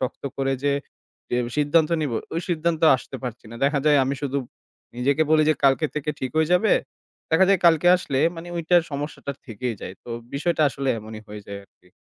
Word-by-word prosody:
শক্ত 130 0 -4
করে 135 0 0
যে 145 - +3 0.6
এ - - +2 0.2
সিদ্ধান্ত 150 +2 +3
নিবো 140 -7 -1 0.2
ঐ - - -4
সিদ্ধান্তে 165 -1 +1
আসতে - - -9
পারছি 120 -2 -6
না। 115 - -8
দেখা 140 +1 +2
যায় 150 -1 +6
আমি 135 +2 -1
শুধু 140 0 -1 0.6
নিজেকে 140 +5 +2
বলি 155 -1 +5
যে - - +3
কালকে 135 +3 +4
থেকে 150 0 -2
ঠিক 130 - -3
হয়ে 160 +1 +2
যাবে। 185 +4 +4 0.6
দেখা 165 +3 +5
যায় 195 -1 +4
কালকে 165 0 +4
আসলে 140 -7 -3 0.2
মানে 165 +1 -8
ঐটার 170 +1 +3
সমস্যাটা 140 0 -4
থেকেই 115 0 -4
যায়। 95 - -7
তো - - -13 0.3
বিষয়টা 155 +2 +1
আসলে 135 0 -4
এমনই 110 0 -9
হয়ে 105 0 -8
যায় 100 0 -6
আর - - -34
কি। 90 - -24
145 Hz, 200 wpm, -24 LUFS, 130-160 Hz, 0.6 s, যায়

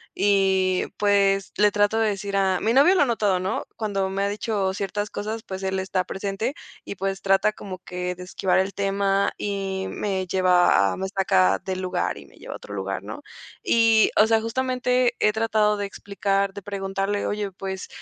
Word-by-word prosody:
y, 190 -2 +2
pues, 200 -1 +2
le 210 0 +4
trato 205 +2 +2
de 220 -1 +2
decir 200 0 -4
a 190 -2 +2
mi 225 +2 +1
novio 290 +8 +6
lo 360 - +5
ha - - +2
notado, 210 -6 +1
¿no? 185 +1 -2
Cuando 195 -3 -1
me 195 +1 -2
ha - - +1
dicho 205 -2 -1
ciertas 205 +1 -3
cosas, 220 +2 -4
pues, 190 0 -7
él 190 0 -1
está 190 -1 -1
presente 200 +7 -3 0.3
y, - - -7
pues, 195 +1 -3
trata 195 +2 +2
como 190 -3 -8
que 180 0 -4
de 180 - -9
esquivar 180 0 0
el 190 +1 -1
tema 195 0 +1
y 195 -2 -3
me 190 -2 -2
lleva 180 - +3
a - - -6
me 190 - -3
saca 95 - +2
del 185 -1 -4
lugar 185 - -2
y 70 - -11
me 65 - -20
lleva - - -8
a - - -7
otro 105 - -11
lugar, 95 -1 -4
¿no? 290 - -8 0.4
Y, 225 - +4
o 215 - +7
sea, 225 0 +3
justamente, 250 +1 0
he 210 - +4
tratado 215 -1 +1
de 205 - -2
explicar, 200 0 -2
de 200 - -9
preguntarle: 195 0 -2
"Oye, 205 -1 -3
pues, 190 0 -6
195 Hz, 195 wpm, -24 LUFS, 190-210 Hz, 0.4 s, o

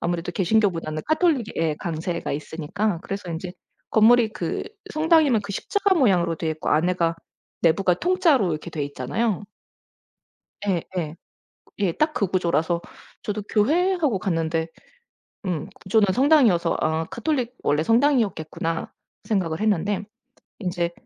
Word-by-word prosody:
아무래도 175 0 -2
개신교보다는 175 -6 +1
가톨릭의 315 -5 +2
예 160 -2 +1
강세가 170 +1 -3
있으니까 165 +7 -2
그래서인지 180 -3 -5 0.4
건물이 225 +1 +5
그 - - -3 0.3
성당이면 310 -7 +4
그 200 0 -6
십자가 400 - +1
모양으로 180 - +3
되어 160 0 -2
있고 155 0 -3
안에가 170 +1 +2 0.5
내부가 180 +2 +3
통짜로 330 - +2
이렇게 155 +2 -5
되어 155 -2 -3
있잖아요. 175 - -2 1.3
예 175 -4 +1 0.2
예. 155 -1 -3 0.6
예 195 -4 +2
딱 305 0 +1
그 200 - 0
구조라서 170 -2 0 0.4
저도 210 0 -3
'교회?' 325 - +3
하고 290 - 0
갔는데 165 -3 -1 1.2
구조는 205 +2 +3
성당이어서 245 - +4
아 160 +1 0
카톨릭 250 - -2
'원래 150 +2 +2
성당이었겠구나.' 210 - +1 0.3
생각을 175 -7 -1
했는데 205 -1 +1 0.6
인제 175 -3 -1
190 Hz, 320 characters per minute, -24 LUFS, 165-235 Hz, 1.3 s, 건물이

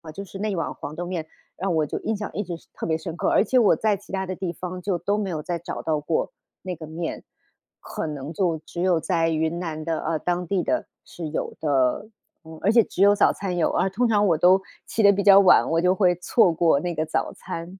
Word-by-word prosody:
就 200 - -5
是 195 +1 -10
那 215 +1 -1
一 195 - -2
碗 165 - -2
黄 150 - -8
豆 175 - -4
面 175 -3 -4 0.3
让 190 -2 -1
我 155 -1 +2
就 - - -4
印 220 -2 -2
象 210 - -5
一 210 - -2
直 175 -3 -6
是 - - -24
特 - - -5
别 160 - +1
深 165 0 -6
刻， - - 0
而 - - +4
且 255 +2 +2
我 220 - +5
在 215 -2 +1
其 200 - -16
它 190 0 -2
的 185 0 -4
地 185 -2 -3
方 180 +1 -7
就 190 -1 -1
都 195 +5 -1
没 205 -2 -2
有 155 -3 -4
再 170 -1 -3
找 170 - -6
到 155 -2 0
过 155 +2 -1 0.3
那 185 -1 -4
个 155 -1 -9
面， 165 +1 -5 0.6
可 - - -5
能 150 +1 -6
就 170 -2 0
只 175 - -6
有 180 -3 +3
在 165 -1 0
云 160 +1 -1
南 155 -3 -4
的， 165 -1 -1
呃， 160 -1 -1
当 175 +2 -2
地 185 0 0
的， - - -1 0.2
是 165 -3 -7
有 155 - -3
的。 135 +4 +1 0.4
嗯， 160 -1 -10
而 205 - +3
且 230 -1 +5
只 190 - -5
有 205 +1 +6
早 - - +4
餐 185 -3 -4
有， 170 - +2
而 190 - +1
通 240 +6 +1
常 210 -2 +3
我 165 -3 +3
都 185 +3 +5 0.2
起 225 - -1
得 200 -1 +7
比 200 0 -1
较 195 0 +8
晚， 190 -3 +6
我 165 +1 +1
就 180 +1 +3
会 185 -3 +3
错 180 0 +3
过 160 -3 +3
那 175 +3 -3
个 155 - -1
早 160 - -2
餐。 170 +3 -8
175 Hz, 280 characters per minute, -24 LUFS, 160-195 Hz, 0.6 s, 较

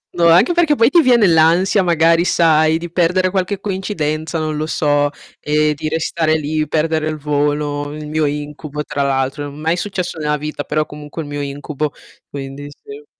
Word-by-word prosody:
No, 170 -1 +3
anche 175 - +5
perché 330 -4 +3
poi 230 -1 +4
ti 340 - +5
viene 240 -7 +4
l'ansia, 170 +4 +4
magari, 165 -1 +3
sai 160 -2 +3
di 170 +1 -7
perdere 180 +2 +1
qualche 190 +1 -1
coincidenza, 165 -6 -3
non 155 -1 -2
lo 155 - -2
so, 145 -2 +1 0.3
e 150 0 +1
di 155 +2 -4
restare 160 0 0
lì, 155 0 -1
perdere 155 0 0
il 155 - -4
volo, 145 0 -1
il 150 0 -7
mio 155 0 0
incubo, 150 0 -4
tra 140 - -2
l'altro. 135 +1 -1
Mai 155 +4 -1
successo 180 -3 -4
nella 150 -1 -1
vita, 150 0 -5
però 155 +1 -1
comunque 150 +2 -8
è - - -7
il 145 - -9
mio 145 0 -3
incubo, 145 +1 -4 0.4
quindi 140 +1 -7
sì. 425 - -12
155 Hz, 180 wpm, -18 LUFS, 150-170 Hz, 0.4 s, anche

